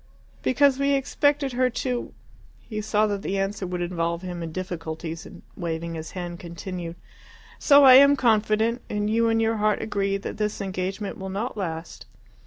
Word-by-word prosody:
"Because 275 Hz, 0 st, +3 dB
we 280 Hz, 0 st, +2 dB
expected 280 Hz, 0 st, +1 dB
her 255 Hz, +1 st, +2 dB
to 245 Hz, 0 st, -3 dB, 0.3 s
" -, -, -28 dB
He 215 Hz, 0 st, -2 dB
saw 215 Hz, 0 st, +2 dB
that 205 Hz, -2 st, -2 dB
the 195 Hz, -, -2 dB
answer 195 Hz, 0 st, -2 dB
would 180 Hz, 0 st, -3 dB
involve 170 Hz, 0 st, -2 dB
him 175 Hz, -2 st, -5 dB
in 165 Hz, -1 st, -5 dB
difficulties, 165 Hz, -2 st, -5 dB
and, -, -, -13 dB
waving 170 Hz, -1 st, -4 dB
his 160 Hz, -1 st, -7 dB
hand, 175 Hz, -1 st, -5 dB
continued, 170 Hz, 0 st, -6 dB, 0.6 s
"So 285 Hz, -1 st, +6 dB
I 260 Hz, -2 st, +10 dB
am 280 Hz, +1 st, +7 dB
confident, 225 Hz, -1 st, +2 dB
and 210 Hz, 0 st, -1 dB
you 230 Hz, +1 st, +3 dB
in 225 Hz, 0 st, +2 dB
your 225 Hz, 0 st, +1 dB
heart 210 Hz, 0 st, +1 dB
agree, 200 Hz, -2 st, -1 dB
that 195 Hz, -, -6 dB
this 210 Hz, 0 st, -2 dB
engagement 195 Hz, +1 st, -4 dB
will 190 Hz, 0 st, -5 dB
not 210 Hz, +6 st, -3 dB
last. 165 Hz, -5 st, -5 dB
200 Hz, 180 wpm, -25 LUFS, 175-230 Hz, 0.6 s, I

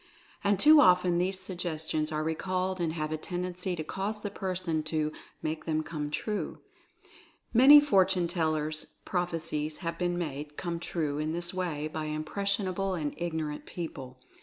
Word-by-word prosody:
And 200 Hz, -1 st, +2 dB
too 305 Hz, +3 st, +8 dB
often 180 Hz, -4 st, +5 dB
these 185 Hz, +1 st, +1 dB
suggestions 160 Hz, -4 st, -2 dB
are 155 Hz, 0 st, -1 dB
recalled 185 Hz, +3 st, -1 dB
and 165 Hz, -2 st, 0 dB
have 155 Hz, -2 st, -3 dB
a 155 Hz, -, -1 dB
tend 180 Hz, +3 st, -4 dB
ency 180 Hz, 0 st, -3 dB
to 160 Hz, -, -4 dB
cause 200 Hz, +6 st, -3 dB
the 205 Hz, -, -4 dB
person 185 Hz, -5 st, -2 dB
to 155 Hz, -1 st, 0 dB, 0.3 s
"make 155 Hz, 0 st, -3 dB
them 155 Hz, -1 st, 0 dB
come 150 Hz, -2 st, -4 dB
true." 210 Hz, +7 st, -3 dB, 1.0 s
Many 270 Hz, +5 st, +10 dB
fortune 190 Hz, -10 st, +3 dB
tellers' 155 Hz, -3 st, -1 dB
prophecies 160 Hz, -4 st, -2 dB
have 165 Hz, 0 st, -3 dB
been 175 Hz, -1 st, 0 dB
made 150 Hz, -3 st, -5 dB
come 170 Hz, -2 st, -3 dB
true 155 Hz, -4 st, -2 dB
in 155 Hz, +1 st, -1 dB
this 175 Hz, +1 st, -2 dB
way 165 Hz, -5 st, -2 dB
by 155 Hz, 0 st, -4 dB
impressionable 190 Hz, +4 st, -1 dB
and 150 Hz, -4 st, -2 dB
ignorant 160 Hz, -3 st, -3 dB
peo 170 Hz, -2 st, -4 dB
ple. 130 Hz, -1 st, -10 dB
170 Hz, 160 wpm, -29 LUFS, 155-185 Hz, 1.0 s, Many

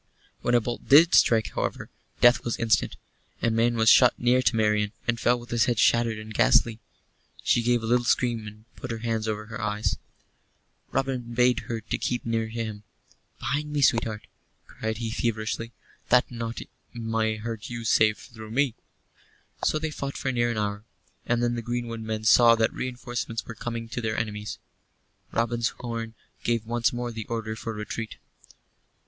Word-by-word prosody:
When 120 Hz, -, +2 dB
a -, -, +6 dB
bolt 120 Hz, +2 st, -5 dB
did 165 Hz, +6 st, +7 dB
strike, 110 Hz, -2 st, +4 dB
however, -, -, -3 dB, 0.3 s
death 120 Hz, +1 st, +6 dB
was 120 Hz, -, -2 dB
instant. 115 Hz, -2 st, +1 dB, 0.5 s
A 115 Hz, -, +3 dB
man 115 Hz, +1 st, +2 dB
was 110 Hz, -1 st, +1 dB
shot 125 Hz, +2 st, +7 dB
near 125 Hz, +1 st, +3 dB
to 125 Hz, -, +2 dB
Marian, 105 Hz, -1 st, +1 dB
and 120 Hz, -1 st, +1 dB
fell 120 Hz, +1 st, +2 dB
with 120 Hz, 0 st, -12 dB
his 120 Hz, -1 st, +3 dB
head 120 Hz, -2 st, 0 dB
shattered 115 Hz, 0 st, +3 dB
and 110 Hz, 0 st, -8 dB
ghastly. 120 Hz, -1 st, +3 dB, 0.6 s
She 120 Hz, -, +3 dB
gave 120 Hz, 0 st, +1 dB
a -, -, -2 dB
little 120 Hz, +2 st, +2 dB
scream, 120 Hz, -2 st, +1 dB
and 105 Hz, +1 st, -12 dB
put 130 Hz, -, -7 dB
her 115 Hz, -, -3 dB
hands 110 Hz, -1 st, -1 dB
over 105 Hz, 0 st, -3 dB
her 110 Hz, 0 st, -7 dB
eyes. 105 Hz, 0 st, -1 dB, 0.9 s
Robin 130 Hz, -3 st, -2 dB
bade 125 Hz, +1 st, +4 dB
her 115 Hz, -1 st, -2 dB
keep 120 Hz, +3 st, -2 dB
near 115 Hz, -1 st, 0 dB
to 110 Hz, -, -9 dB
him 110 Hz, -2 st, -4 dB, 0.6 s
"Behind 150 Hz, +1 st, -2 dB
me, 145 Hz, -1 st, 0 dB
sweetheart," 115 Hz, -3 st, +2 dB, 0.4 s
cried 110 Hz, 0 st, -4 dB
he, 115 Hz, -1 st, -3 dB
feverishly, 115 Hz, 0 st, -2 dB, 0.4 s
"that 125 Hz, 0 st, +4 dB
naught 115 Hz, -1 st, -4 dB, 0.3 s
may 115 Hz, -1 st, 0 dB
hurt 110 Hz, 0 st, -6 dB
you 120 Hz, -1 st, -5 dB
save 110 Hz, 0 st, +4 dB
through 110 Hz, -3 st, -11 dB
me." 130 Hz, +2 st, +1 dB, 0.9 s
So -, -, +2 dB
they 155 Hz, 0 st, -3 dB
fought 140 Hz, -1 st, -5 dB
for 130 Hz, -, -1 dB
near 120 Hz, -1 st, +1 dB
an 115 Hz, -, -2 dB
hour; 105 Hz, -1 st, -2 dB, 0.4 s
and 120 Hz, 0 st, +1 dB
then 120 Hz, 0 st, +1 dB
the 120 Hz, -, -3 dB
greenwood 120 Hz, -1 st, -4 dB
men 110 Hz, -1 st, -4 dB
saw 115 Hz, +1 st, +7 dB
that 115 Hz, -1 st, +1 dB
reinforcements 120 Hz, -2 st, -4 dB
were -, -, -7 dB
coming 115 Hz, +1 st, -5 dB
to 120 Hz, -, -4 dB
their 110 Hz, -1 st, -2 dB
enemies. 105 Hz, -1 st, -3 dB, 0.7 s
Robin's 115 Hz, 0 st, 0 dB
horn 115 Hz, -2 st, -5 dB, 0.3 s
gave 115 Hz, -2 st, 0 dB
once 120 Hz, +1 st, +1 dB
more 120 Hz, 0 st, -3 dB
the 110 Hz, -2 st, -6 dB
order 110 Hz, -1 st, -3 dB
for 115 Hz, +1 st, -5 dB
retreat. 110 Hz, +1 st, -5 dB
115 Hz, 175 wpm, -26 LUFS, 110-120 Hz, 0.9 s, did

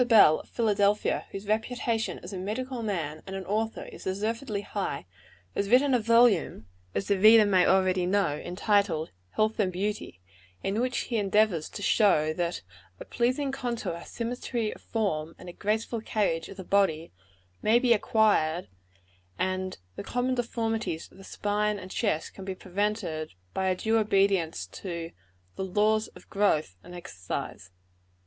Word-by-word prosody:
Bell, 210 Hz, -10 st, +7 dB
of -, -, -14 dB
Philadelphia, 210 Hz, -2 st, +1 dB
whose 195 Hz, +1 st, -7 dB
reputation 225 Hz, +1 st, -1 dB
as 180 Hz, +3 st, -8 dB
a -, -, -4 dB
medical 240 Hz, +6 st, -3 dB
man 165 Hz, -8 st, -3 dB
and 190 Hz, -, -5 dB
an 190 Hz, -1 st, -5 dB
author 220 Hz, +3 st, -1 dB
is -, -, -11 dB
deservedly 215 Hz, +3 st, -2 dB
high, 200 Hz, -, -4 dB, 0.5 s
has 200 Hz, 0 st, -1 dB
written 260 Hz, +3 st, +5 dB
a 250 Hz, -, +4 dB
volume, 230 Hz, -, +3 dB, 0.3 s
as 195 Hz, -, -1 dB
the 200 Hz, -2 st, +2 dB
reader 215 Hz, +2 st, +8 dB
may 185 Hz, -3 st, +4 dB
already 185 Hz, -1 st, +3 dB
know, 195 Hz, -6 st, +2 dB
entitled, 180 Hz, -1 st, 0 dB, 0.2 s
"Health 215 Hz, +1 st, +1 dB
and 190 Hz, -3 st, +2 dB
Beauty" 195 Hz, -, -3 dB, 0.4 s
in 200 Hz, +4 st, 0 dB
which 255 Hz, 0 st, 0 dB
he 235 Hz, -, -2 dB
endeavors 205 Hz, -5 st, +2 dB
to 205 Hz, -, -7 dB
show 155 Hz, -9 st, +3 dB
that 170 Hz, +1 st, -2 dB, 0.4 s
"a -, -, -8 dB
pleasing 255 Hz, +3 st, 0 dB
contour, 235 Hz, -10 st, -3 dB
symmetry 235 Hz, -1 st, -3 dB
of -, -, -16 dB
form, 165 Hz, -8 st, -2 dB
and 180 Hz, -, -12 dB
a 175 Hz, -, -7 dB
graceful 220 Hz, +3 st, -1 dB
carriage 190 Hz, -8 st, -1 dB
of 195 Hz, -, -10 dB
the 190 Hz, -, -6 dB
body," 175 Hz, -4 st, +1 dB, 0.5 s
may 220 Hz, +2 st, +4 dB
be 245 Hz, -1 st, +4 dB
acquired, 205 Hz, -7 st, +2 dB, 0.7 s
and 185 Hz, 0 st, -2 dB, 0.2 s
"the -, -, -4 dB
common 250 Hz, +4 st, -1 dB
deformities 225 Hz, -7 st, -2 dB
of -, -, -17 dB
the -, -, -11 dB
spine 210 Hz, +1 st, -1 dB
and 185 Hz, -1 st, -9 dB
chest 195 Hz, -2 st, -2 dB
be 190 Hz, 0 st, -4 dB
prevented," 185 Hz, -, -2 dB, 0.2 s
by 190 Hz, -, 0 dB
a 185 Hz, -, +2 dB
due 225 Hz, +4 st, +1 dB
obedience 195 Hz, -6 st, +2 dB
to 170 Hz, -3 st, -6 dB, 0.5 s
the -, -, -2 dB
"laws 215 Hz, +3 st, +2 dB
of -, -, -17 dB
growth 160 Hz, -, +1 dB
and 180 Hz, -, -11 dB
exercise." 95 Hz, -, -6 dB
205 Hz, 155 wpm, -28 LUFS, 180-225 Hz, 0.7 s, reader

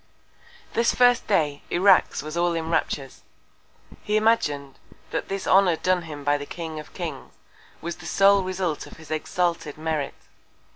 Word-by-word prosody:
This 230 Hz, 0 st, +2 dB
first 245 Hz, -1 st, +4 dB
Day 150 Hz, -8 st, +1 dB
Irax 185 Hz, -4 st, +4 dB
was 155 Hz, +1 st, -6 dB
all 170 Hz, 0 st, +1 dB
in 165 Hz, 0 st, -3 dB
Raptures; 140 Hz, -4 st, -2 dB, 0.8 s
he 210 Hz, +1 st, 0 dB
imagin'd, 150 Hz, -, +1 dB, 0.3 s
that -, -, -2 dB
this 195 Hz, 0 st, -3 dB
Honour 190 Hz, -3 st, +5 dB
done 185 Hz, +2 st, +1 dB
him 150 Hz, -3 st, -8 dB
by 145 Hz, +1 st, +2 dB
the 145 Hz, -, -7 dB
King 160 Hz, -2 st, -6 dB
of 150 Hz, -, -11 dB
Kings, -, -, -6 dB, 0.5 s
was 170 Hz, 0 st, -5 dB
the 175 Hz, -1 st, -10 dB
sole 195 Hz, 0 st, +5 dB
Result 185 Hz, -4 st, -3 dB
of -, -, -13 dB
his 160 Hz, 0 st, -13 dB
exalted 165 Hz, -1 st, -1 dB
Merit. 155 Hz, -3 st, -2 dB
170 Hz, 155 wpm, -24 LUFS, 155-190 Hz, 0.8 s, Honour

